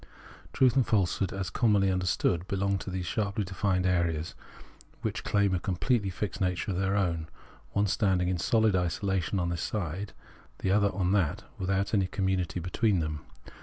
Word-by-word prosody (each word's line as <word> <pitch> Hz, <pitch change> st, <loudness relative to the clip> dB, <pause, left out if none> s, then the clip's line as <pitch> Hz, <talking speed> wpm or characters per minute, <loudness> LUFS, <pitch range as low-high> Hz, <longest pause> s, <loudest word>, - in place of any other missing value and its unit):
Truth 130 Hz, -1 st, +3 dB
and 130 Hz, -3 st, +3 dB
falsehood 100 Hz, -2 st, +1 dB
as 95 Hz, -4 st, -4 dB
commonly 100 Hz, -3 st, +3 dB
understood 90 Hz, -1 st, 0 dB
belong 100 Hz, 0 st, 0 dB
to -, -, -6 dB
those 90 Hz, -1 st, -3 dB
sharply 100 Hz, +3 st, -1 dB
defined 95 Hz, 0 st, 0 dB
ideas 85 Hz, -3 st, 0 dB, 0.7 s
which -, -, -2 dB
claim 100 Hz, -2 st, +2 dB
a 90 Hz, -, +1 dB
completely 100 Hz, +4 st, 0 dB
fixed 95 Hz, +2 st, -4 dB
nature 90 Hz, +2 st, 0 dB
of 90 Hz, -, -1 dB
their 95 Hz, 0 st, +1 dB
own, 85 Hz, -5 st, 0 dB, 0.5 s
one 100 Hz, +1 st, +2 dB
standing 95 Hz, -2 st, +1 dB
in 90 Hz, 0 st, 0 dB
sohd 110 Hz, +3 st, +2 dB
isolation 95 Hz, +1 st, 0 dB
on 85 Hz, -1 st, 0 dB
this 85 Hz, -1 st, -2 dB
side, 95 Hz, 0 st, -3 dB, 0.4 s
the 95 Hz, -, -1 dB
other 100 Hz, 0 st, +3 dB
on 95 Hz, -2 st, +1 dB
that, 95 Hz, -7 st, +1 dB, 0.2 s
without 95 Hz, +2 st, 0 dB
any 95 Hz, -3 st, +3 dB
community 95 Hz, -2 st, -1 dB
between 95 Hz, +4 st, +1 dB
them. 80 Hz, -2 st, -2 dB
95 Hz, 165 wpm, -29 LUFS, 90-100 Hz, 0.7 s, Truth